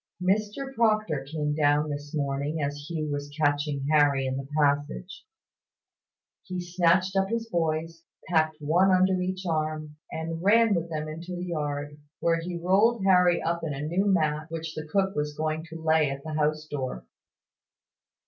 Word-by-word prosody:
Mr 210 +8 -1
Proctor 215 - +1
came 150 -2 -1
down 150 0 +2
this 145 0 -6
morning 140 +2 -1
as 145 +1 -3
Hugh 155 -3 -2
was 145 0 -3
catching 145 -1 +1
Harry 145 -3 +4
in 130 0 -1
the 135 0 -5
passage. 145 +5 0 1.2
He 185 -2 -5
snatched 180 +1 +2
up 195 0 +2
his 230 0 -2
boys, 165 -3 -1 0.3
packed 155 -2 +2
one 165 +6 +3
under 185 0 +3
each 185 +1 -3
arm, 155 -2 -2
and 165 +1 -4
ran 220 +3 +5
with 170 -2 -1
them 155 -1 -3
into 170 +4 -6
the 175 +1 -4
yard, 145 -3 -3 0.2
where 165 0 +2
he 175 +1 -4
rolled 195 +6 +3
Harry 180 -2 +4
up 170 0 -1
in 150 -3 -2
a 135 - -5
new 185 +5 +1
mat, 155 -5 +1
which 165 -1 -5
the 155 0 -6
cook 195 +4 0
was 150 0 -2
going 155 +1 -2
to 165 0 -9
lay 160 -2 +3
at 135 0 -5
the 155 - -5
house 155 0 0
door. 130 - -5
160 Hz, 165 wpm, -27 LUFS, 150-180 Hz, 1.2 s, ran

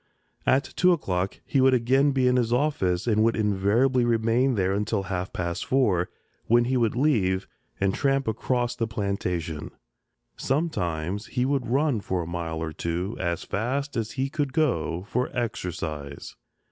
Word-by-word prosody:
At 135 +2 +4
two 180 0 +5
o'clock 95 - -2
he 135 - +2
would 130 0 +5
again 130 +4 +3
be 130 -2 +2
in 125 - +3
his 120 -2 +1
office 120 -10 +1
and 110 -2 +2
would 115 0 +3
invariably 110 +5 +2
remain 120 +2 +2
there 95 -2 +1
until 105 0 -1
half 95 -1 -3
past 85 -1 -3
four, 100 -10 +2 0.4
when 120 +1 +4
he 130 +2 0
would 115 -3 +1
leave 105 -9 +1 0.3
and 95 -1 +1
tramp 135 -1 +1
across 120 +2 0
the 115 - -1
plantation; 90 -7 -3 0.7
sometimes 100 - -1
he 125 - 0
would 135 -1 0
run 135 0 +2
for 95 -3 -2
a - - -7
mile 85 -2 -3
or 80 -1 -4
two, 85 +7 -3
as 85 -2 -1
fast 135 +7 -2
as 110 -2 -2
he 135 0 -1
could 145 -2 -2
go, 90 - 0
for 125 +3 -1
exercise. 85 - -4
110 Hz, 160 wpm, -26 LUFS, 90-130 Hz, 0.7 s, two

